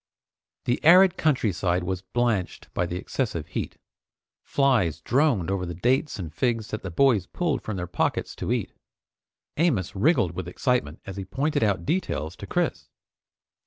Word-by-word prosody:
The 120 - 0
arid 180 +3 +7
countryside 100 - +1
was 95 0 -2
blanched 110 -1 -2
by 90 - 0
the 85 - -4
excessive 90 - -2
heat. - - -4 0.6
Flies 120 - +2
droned 120 - +1
over 95 -2 -1
the 85 -1 -5
dates 130 - +1
and 85 -6 -6
figs 115 +2 0
that 110 - -4
the 95 - -5
boys 115 +2 +3
pulled 170 -5 -1
from 110 -3 -4
their 90 - -3
pockets 90 - -1
to - - -3
eat. - - -1 0.8
Amos 135 - +1
wriggled 115 - +3
with 85 0 -5
excitement 90 - -1
as 95 -1 -7
he 95 - -4
pointed 140 +10 -1
out 100 -6 +1
details 90 - -1
to - - -8
Chris. - - -1
105 Hz, 160 wpm, -25 LUFS, 90-135 Hz, 0.8 s, arid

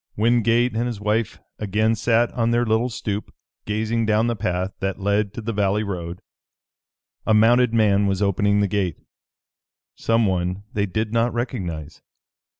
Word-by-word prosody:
Wingate 115 +2 +2
and 120 +2 0
his 115 -4 -4
wife 105 +1 -1 0.2
again 110 +2 +1
sat 115 +1 +2
on 115 -2 0
their 120 +1 +2
little 110 +2 +1
stoop, 105 -3 -4 0.3
gazing 110 +2 -1
down 110 +1 +3
the 120 0 0
path 95 -2 -2
that 95 -1 -2
led 100 +1 0
to 115 - -5
the 115 +1 -3
valley 100 +1 +1
road. 90 -3 -5 1.0
A 110 - +4
mounted 120 +2 +4
man 105 -3 +3
was 95 -1 0
opening 100 +1 +2
the 100 - +2
gate, 95 -5 -1 1.0
someone 95 -4 0
they 100 -1 0
did 110 +3 -2
not 115 +1 +2
recognize. 90 - -4
105 Hz, 150 wpm, -22 LUFS, 100-115 Hz, 1.0 s, A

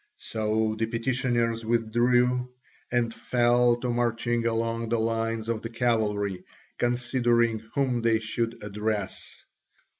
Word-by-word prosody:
So 110 0 -1
the 115 - +1
petitioners 115 -1 0
withdrew, 120 +2 +2 0.4
and 120 -1 +1
fell 120 +1 +3
to 125 - -1
marching 120 0 0
along 115 0 -1
the 115 - +1
lines 115 0 -1
of 115 -2 -1
the 115 - -5
cavalry, 105 -5 0 0.4
considering 120 -2 +2 0.2
whom 130 -4 +1
they 115 -1 +3
should 115 +1 -3
address. 105 -1 -4
115 Hz, 115 wpm, -27 LUFS, 110-120 Hz, 0.4 s, fell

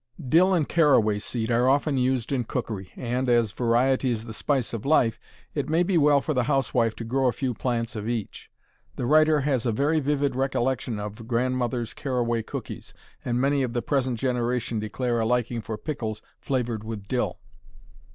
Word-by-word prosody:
Dill 175 +8 +5
and 155 -5 +1
caraway 130 -11 +3
seed 115 +2 -2
are 120 +2 +3
often 140 +1 +2
used 130 -2 0
in 125 -4 0
cookery, 110 -7 -4
and, 125 +1 -2
as 120 -3 +3
"variety 125 +4 +2
is 115 -2 -2
the 110 - -7
spice 130 -1 -1
of 115 - -4
life," 130 -6 +2 0.3
it 145 -1 -2
may 165 +3 +3
be 185 +1 0
well 145 -3 +5
for 155 - -2
the 125 -3 +1
housewife 120 -5 +1
to - - -6
grow 130 +3 +1
a - - +3
few 125 +1 -2
plants 115 0 -2
of 105 +1 -4
each. 115 -4 -4 0.5
The - - -3
writer 155 +2 +4
has 135 -4 0
a - - +2
very 145 +8 +1
vivid 145 -2 0
recollection 130 -3 -1
of 105 +2 -7
grandmother's 125 -1 -1
caraway 120 -4 -1
cookies, 110 - -7 0.3
and 120 0 -1
many 140 +1 +2
of 125 -3 -2
the 120 - -1
present 130 -4 0
generation 120 -2 -1
declare 120 +3 -1
a 110 - +1
liking 120 -1 0
for 110 +1 -5
pickles 110 -5 -4 0.2
flavored 120 -5 -2
with 110 -3 -6
dill. 125 +2 -1
125 Hz, 185 wpm, -25 LUFS, 115-135 Hz, 0.5 s, Dill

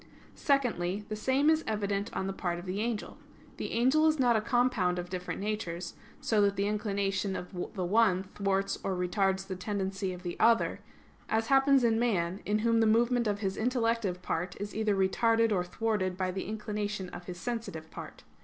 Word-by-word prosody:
Secondly, 210 - 0
the 215 - -2
same 260 +6 +1
is 320 0 +4
evident 205 -1 -1
on - - -2
the 195 - -2
part 175 -2 -2
of 175 - -8
the 185 +2 -3
angel. 225 -2 -3 0.4
The - - -4
angel 265 +7 +4
is 310 0 +3
not 245 -3 +4
a 220 - +2
compound 230 -6 +1
of 175 0 -5
different 180 -1 -4
natures, 190 -4 -3 0.3
so 215 -2 +2
that 200 -1 +3
the 200 - 0
inclination 200 -2 -1
of 180 - -6 0.2
the 185 -2 -1
one 190 -1 +3
thwarts 195 -1 0
or 190 - -1
retards 190 +1 0
the 190 -1 -5
tendency 195 0 -2
of 180 0 -8
the 175 -1 -4
other; 230 0 +3 0.5
as 225 +1 0
happens 270 -1 +5
in 225 -1 +3
man, 190 -6 0
in 210 +1 +2
whom 230 0 +4
the 225 - +4
movement 235 +1 +3
of 205 0 -1
his 195 -2 -1
intellective 230 -6 0
part 180 0 -3
is 205 +1 -5
either 215 -2 +1
retarded 225 +4 +2
or 185 -3 +2
thwarted 185 -1 -1
by 185 -1 -1
the 190 +1 -4
inclination 210 -2 -3
of 175 - -9
his 180 -1 -7
sensitive 200 -9 -5
part. - - -9
205 Hz, 190 wpm, -30 LUFS, 190-230 Hz, 0.5 s, happens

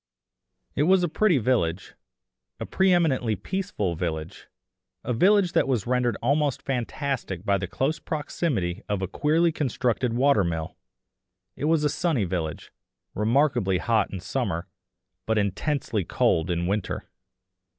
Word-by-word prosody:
It 150 +5 +2
was 190 -1 +5
a - - +2
pretty 175 +1 +2
village, 105 -8 0 0.7
a - - -4
pre 190 0 +2
eminently 135 -10 +2
peaceful 180 - -3
village; 80 +1 -4 0.6
a 125 - -1
village 190 - +4
that - - +2
was 125 -7 0
rendered 125 -3 +1
almost 145 +2 +1
fantastic 125 - -3
by 100 -1 +2
the 95 - -3
close 135 - -1
proximity 130 - -2
of 100 -2 -1
a - - -1
queerly 155 - +2
constructed 125 -5 -1
water 130 -3 +3
mill; 80 -2 -3 0.8
it - - -3
was 160 -1 +2
a - - +4
sunny 155 - 0
village, 85 -4 -4 0.4
remarkably 115 -3 +2
hot 110 +2 +1
in 95 - -5
summer, 95 -3 -2 0.6
but 110 0 +1
intensely 105 +2 -1
cold 80 0 +1
in 85 0 0
winter. 100 +1 -2
120 Hz, 140 wpm, -25 LUFS, 95-150 Hz, 0.8 s, was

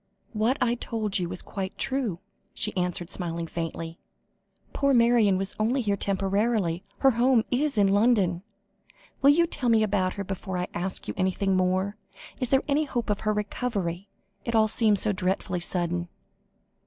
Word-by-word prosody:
"What 225 +5 +1
I 240 -2 +2
told 215 -4 -2
you 175 -1 -2
was 180 0 -7
quite 195 0 -5
true," 260 -10 -1 0.4
she 210 - -1
answered, 180 -1 -2
smiling 170 -3 -2
faintly. 165 0 -5 0.7
"Poor 280 -1 +2
Marion 235 -5 +4
was 195 +1 -2
only 235 +5 +1
here 205 -3 +1
temporarily, 195 -2 0 0.2
her 270 - +6
home 240 0 +3
is 275 0 0
in 200 -1 +4
London. 200 -5 +3 0.8
Will 275 - +6
you 335 +4 +5
tell 275 -7 -1
me 225 -1 +4
about 195 -3 +1
her 200 - -3
before 190 -1 -4
I 180 - -1
ask 185 +2 -4
you - - -3
anything 190 +1 +1
more? 185 +2 +1 0.4
Is 255 -3 -1
there 270 0 +3
any 300 +2 +2
hope 240 -5 -2
of 205 - -1
her 215 - 0
recovery? 205 -3 -3 0.3
It 235 - -2
all 220 -1 +5
seemed 215 -1 +3
so 210 +2 +1
dreadfully 185 -1 -1
sudden." 175 0 -1
205 Hz, 165 wpm, -26 LUFS, 185-235 Hz, 0.8 s, her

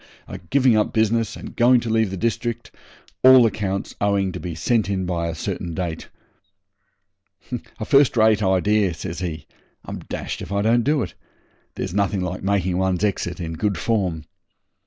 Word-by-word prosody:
are - - -7
giving 130 -4 +4
up 105 - +1
business 110 0 +1
and - - -9
going 125 +1 +5
to 120 - -6
leave 110 -2 +2
the 95 - -5
district, 115 +3 -2 0.5
all 130 -1 +8
accounts 100 -3 -2
owing 100 -2 +1
to - - -6
be 85 -3 -5
sent 105 +6 +1
in 95 -2 -1
by 85 -2 -2
a 85 - -4
certain 85 +1 -4
date.' 85 -2 -4 1.7
'A 110 - -3
first 140 -1 +4
rate 110 -1 +4
idea,' 95 -1 +2
says 85 +1 -6
he. 80 -5 -5 0.4
'I'm - - -6
dashed - - -4
if - - -8
I 100 0 0
don't 115 +2 +3
do 145 -1 +1
it. - - -7 0.6
There's - - -4
nothing 100 -1 0
like 90 0 -4
making 95 -2 0
one's 95 0 0
exit 90 -3 -1
in 80 -2 -4
good 100 +3 -1
form. 90 -4 -1
100 Hz, 175 wpm, -22 LUFS, 90-115 Hz, 1.7 s, all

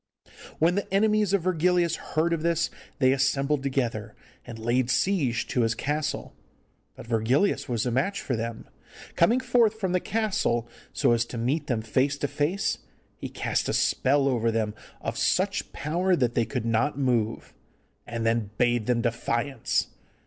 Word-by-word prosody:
When 165 +3 +3
the 200 0 -3
enemies 210 0 +3
of 200 -4 +2
Virgilius 180 -1 +2
heard 165 +2 -1
of 165 - -1
this, 170 0 +1 0.3
they 130 -2 +4
assembled 135 +1 +1
together 120 -6 -2 0.3
and 115 -2 -7
laid 120 +2 0
siege 130 - +1
to 125 - +1
his 115 0 +1
castle. 150 +5 -2 0.6
But - - -10
Virgilius 120 - +1
was 115 -2 0
a 125 - 0
match 150 +12 0
for 125 - -2
them. 115 0 -5 0.5
Coming 230 +9 +4
forth 235 -4 +2
from 190 -4 -1
the 180 - +2
castle 190 - 0 0.2
so - - +2
as 120 0 +3
to 120 - -7
meet 140 +6 -1
them 120 -6 -1
face 130 +6 +1
to 145 - -1
face, 155 +8 -1 0.4
he - - -6
cast - - -1
a - - 0
spell 140 +1 +2
over 115 -4 +1
them 110 -2 -1 0.3
of - - -3
such - - +1
power 175 +5 0
that 125 -7 +1
they 115 - +1
could 120 +1 -3
not 115 +5 +1
move, 120 -5 0 0.5
and 115 0 -3
then 115 -2 +1
bade 120 -2 +2
them 120 -1 +2
defiance. 120 +2 -1
135 Hz, 165 wpm, -26 LUFS, 115-170 Hz, 0.6 s, they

